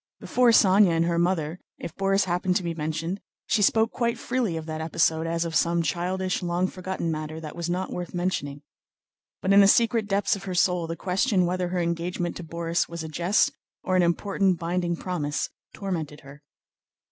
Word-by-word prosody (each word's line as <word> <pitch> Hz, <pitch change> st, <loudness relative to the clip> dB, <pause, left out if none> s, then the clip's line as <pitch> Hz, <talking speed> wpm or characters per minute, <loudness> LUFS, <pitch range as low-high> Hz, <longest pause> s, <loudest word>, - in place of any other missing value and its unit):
Before 250 Hz, -1 st, +2 dB
Sónya 195 Hz, -4 st, +6 dB
and 165 Hz, -, +2 dB
her 170 Hz, 0 st, +1 dB
mother, 170 Hz, -1 st, 0 dB, 0.2 s
if 165 Hz, -, -8 dB
Borís 195 Hz, 0 st, +2 dB
happened 180 Hz, 0 st, 0 dB
to 185 Hz, -, +1 dB
be 170 Hz, -1 st, -2 dB
mentioned, 160 Hz, +4 st, -3 dB, 0.2 s
she 210 Hz, -, +1 dB
spoke 220 Hz, +3 st, +3 dB
quite 235 Hz, -1 st, -1 dB
freely 235 Hz, -8 st, -1 dB
of 160 Hz, -, -6 dB
that 155 Hz, -1 st, -4 dB
episode 160 Hz, 0 st, +1 dB
as 165 Hz, 0 st, -1 dB
of 165 Hz, -, -4 dB
some 170 Hz, 0 st, +2 dB
childish, 185 Hz, +4 st, -1 dB
long 175 Hz, +1 st, 0 dB
forgotten 185 Hz, -2 st, -3 dB
matter 155 Hz, 0 st, -4 dB
that 155 Hz, -2 st, -8 dB
was 170 Hz, 0 st, -4 dB
not 185 Hz, +2 st, -2 dB
worth 175 Hz, -1 st, -5 dB
mentioning. 160 Hz, -6 st, -3 dB, 0.8 s
But 190 Hz, -, +3 dB
in 200 Hz, -, +8 dB
the 195 Hz, -, +7 dB
secret 230 Hz, 0 st, +3 dB
depths 200 Hz, 0 st, +1 dB
of 195 Hz, -, -9 dB
her 185 Hz, -2 st, -4 dB
soul 175 Hz, -1 st, +2 dB
the 165 Hz, -, -4 dB
question 190 Hz, +2 st, +1 dB
whether 180 Hz, +1 st, -1 dB
her 180 Hz, 0 st, -2 dB
engagement 170 Hz, +1 st, -2 dB
to 175 Hz, -, -7 dB
Borís 170 Hz, +1 st, -1 dB
was 170 Hz, -1 st, -5 dB
a -, -, -5 dB
jest 175 Hz, +6 st, +2 dB, 0.3 s
or 185 Hz, -, 0 dB
an 185 Hz, -, +5 dB
important, 190 Hz, +2 st, +1 dB
binding 170 Hz, +1 st, -1 dB
promise 165 Hz, -5 st, -3 dB, 0.2 s
tormented 160 Hz, -7 st, -4 dB
her. 140 Hz, +1 st, -13 dB
175 Hz, 195 wpm, -26 LUFS, 165-190 Hz, 0.8 s, in